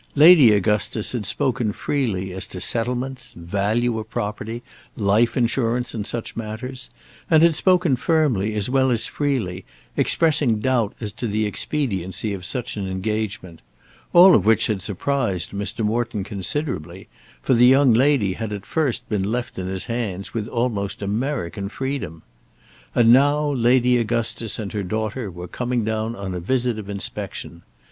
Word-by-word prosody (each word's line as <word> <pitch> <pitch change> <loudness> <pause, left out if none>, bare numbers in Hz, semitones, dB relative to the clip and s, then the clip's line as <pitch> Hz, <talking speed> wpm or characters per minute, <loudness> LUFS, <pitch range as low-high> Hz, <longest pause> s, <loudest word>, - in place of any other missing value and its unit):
Lady 150 -5 +8
Augustus 105 +1 +1
had 115 -6 -3
spoken 125 -6 0
freely 100 -8 -2
as 95 +1 -5
to 90 - -6
settlements, 125 +5 -2
value 105 +7 -1
of 110 0 -8
property, 110 +3 -4 0.3
life 110 +3 +2
insurance 120 0 0
and 105 -3 -4
such 120 -1 -5
matters; 115 +4 -6 0.4
and 160 -1 +5
had 170 -2 +5
spoken 180 -4 +3
firmly, 125 - +1
as 105 -2 0
well 130 0 +2
as 115 -3 +1
freely, 115 -11 -2 0.3
expressing 150 -8 +2
doubt 120 -2 0
as 105 -3 -4
to 120 - -4
the 110 +1 0
expediency 100 - -2
of 95 -2 -6
such 120 +2 -3
an 100 -2 -3
engagement; 95 -3 -4 0.5
all 180 +2 +8
of 100 - +4
which 110 +2 +4
had 105 -4 -1
surprised 100 -3 -1
Mr. 100 +2 -3
Morton 115 -1 -1
considerably, 95 - -4 0.3
for - - +1
the 120 0 +6
young 135 -1 +5
lady 125 -5 +3
had 110 +1 -5
at 100 -1 -6
first 150 -7 -1
been 100 -2 -1
left 120 -4 -3
in 90 - -4
his 95 0 -2
hands 110 -5 -4
with 110 -2 -3
almost 110 -5 -2
American 100 -3 -2
freedom. 110 - -4 0.7
And 115 -1 +6
now 145 +3 +3
Lady 125 -1 +3
Augustus 115 -1 -2
and 105 -3 -5
her 105 - -2
daughter 110 +3 -3
were 90 0 -8
coming 120 +4 -2
down 110 +1 -2
on 100 -3 -5
a 90 - -3
visit 120 +4 0
of 100 -1 -8
inspection. 95 -3 -4
115 Hz, 155 wpm, -22 LUFS, 100-125 Hz, 0.7 s, Lady